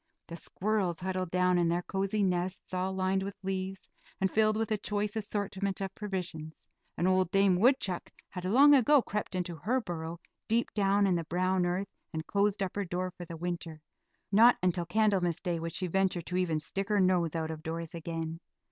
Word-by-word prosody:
The 165 - -8
squirrels 190 -1 -1
huddled 185 -1 -2
down 180 0 +2
in 170 -1 +2
their 175 +1 0
cozy 195 +3 -1
nests, 180 0 -2
all 185 +1 0
lined 190 0 0
with 195 0 -5
leaves, 190 0 -3 0.3
and 190 -1 +1
filled 215 0 +3
with 225 0 -1
a 215 - +2
choice 205 +1 -2
assortment 200 -2 -2
of 195 -1 -4
provisions, 180 -7 -5 0.3
and 175 - +1
old 185 -1 +3
Dame 195 -1 +4
Woodchuck 215 -6 +2 0.2
had 180 - -7
long 270 +10 +6
ago 275 0 +5
crept 205 -2 -4
into 180 -2 -2
her 230 - 0
burrow, 170 -5 -5 0.3
deep 230 +2 +1
down 200 -1 +3
in 190 - +3
the 170 -1 0
brown 180 +2 +1
earth, 185 +3 -2 0.2
and 160 0 -4
closed 200 0 +1
up 185 - -4
her 205 - -1
door 180 +1 -3
for 175 - -9
the 165 0 -8
winter; 170 -2 -4 0.5
not 230 +4 +7
until 175 -1 +1
Candlemas 190 -4 +2
Day 175 -2 -2
would 165 0 -4
she 185 - -2
venture 185 0 +1
to 180 +2 -5
even 175 -4 +1
stick 195 +7 -4
her 210 -1 +3
nose 180 -3 +2
out 160 -1 -2
of 155 -1 -7
doors 165 0 -5
again. 165 -1 -4
185 Hz, 195 wpm, -30 LUFS, 175-200 Hz, 0.5 s, not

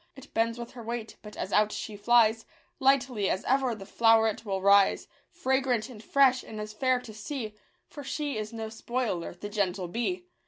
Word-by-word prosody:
It 270 0 -14
bends 230 +1 +1
with 235 0 -7
her 245 - -10
weight, 230 0 -5
but, 210 -1 -11
as 190 - -4
out 210 0 +4
she 215 - -5
flies, 225 +1 +4 0.4
Lightly 260 -6 +2
as 190 - -1
ever 260 -2 +2
the 195 -2 -10
flow'ret 225 +1 +3
will 195 -3 -2
rise. 200 0 +4 0.2
Fragrant 260 -4 0
and 225 -4 -11
fresh, 265 0 +4
and 215 - -8
as 210 0 -6
fair 255 +3 +1
to 230 -3 -11
see; 215 +1 -5 0.3
For 290 - -10
she 290 +1 -3
is 215 -1 -4
no 225 -1 -5
spoiler, 225 -6 -3
the 195 +4 -7
gentle 195 -3 -1
bee 295 - -2
225 Hz, 190 wpm, -28 LUFS, 210-255 Hz, 0.4 s, out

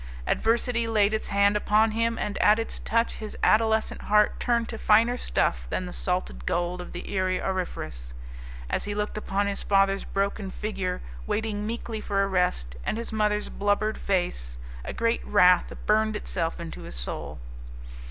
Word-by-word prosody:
Adversity 230 +1 +1
laid 215 -2 +3
its 220 - -1
hand 200 0 +3
upon 215 +1 +3
him, 230 +1 0
and 210 - -2
at 210 +1 +5
its 225 - -4
touch 230 +1 0
his 215 -1 -6
adolescent 220 0 +3
heart 210 0 +3
turned 235 -2 +1
to 225 - -6
finer 230 +3 +4
stuff - - 0
than - - -2
the - - -7
salted - - -2
gold 175 +1 -1
of 180 - -9
the 175 - -7
Erie 185 -1 +1
Auriferous. 75 - -4 0.5
As - - -1
he 205 0 -3
looked 210 0 -2
upon 205 -1 -1
his 200 0 -1
father's 195 0 +2
broken 200 0 -2
figure 190 -2 -3 0.3
waiting 210 -1 -1
meekly 225 -1 -4
for 195 -1 +1
arrest, 180 - 0
and - - -1
his 230 -1 -5
mother's 210 -1 +1
blubbered 205 +2 0
face, 60 - -1 0.3
a - - -4
great 230 0 0
wrath 180 -3 +5
burned 215 0 +3
itself 165 -5 -2
into 170 -1 -7
his - - -8
soul. 65 +4 -4
205 Hz, 165 wpm, -26 LUFS, 180-220 Hz, 0.5 s, at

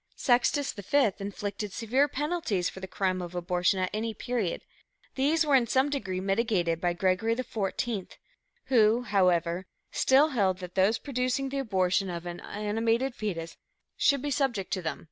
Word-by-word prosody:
Sextus 250 +3 +2
V 215 +3 +2
inflicted 205 +1 -4
severe 245 +7 +1
penalties 295 - -1
for - - -10
the 190 - -6
crime 185 -1 -1
of 175 0 -7
abortion 180 +1 +1
at 185 0 -1
any 220 +1 -2
period; 230 -6 -2 0.5
these 310 +4 +2
were 290 - +1
in 250 -3 +5
some 265 +4 +2
degree 195 -10 -2
mitigated 195 -4 0
by 175 -1 +1
Gregory 190 +5 +1
XIV, 225 -3 -3 0.6
who, 235 -2 +4
however, 180 -4 +1 0.2
still 275 +4 +4
held 195 -9 +1
that 180 -1 -8
those 195 +4 +3
producing 270 0 -1
the 275 +1 -2
abortion 190 -5 +1
of 170 -1 -5
an 175 0 -6
animated 225 +5 -1
foetus 170 -8 -4 0.4
should 280 -1 +2
be 290 - -2
subject 245 -8 -1
to 185 - -1
them, 160 -2 -3
viz. - - -18
210 Hz, 165 wpm, -28 LUFS, 185-255 Hz, 0.6 s, in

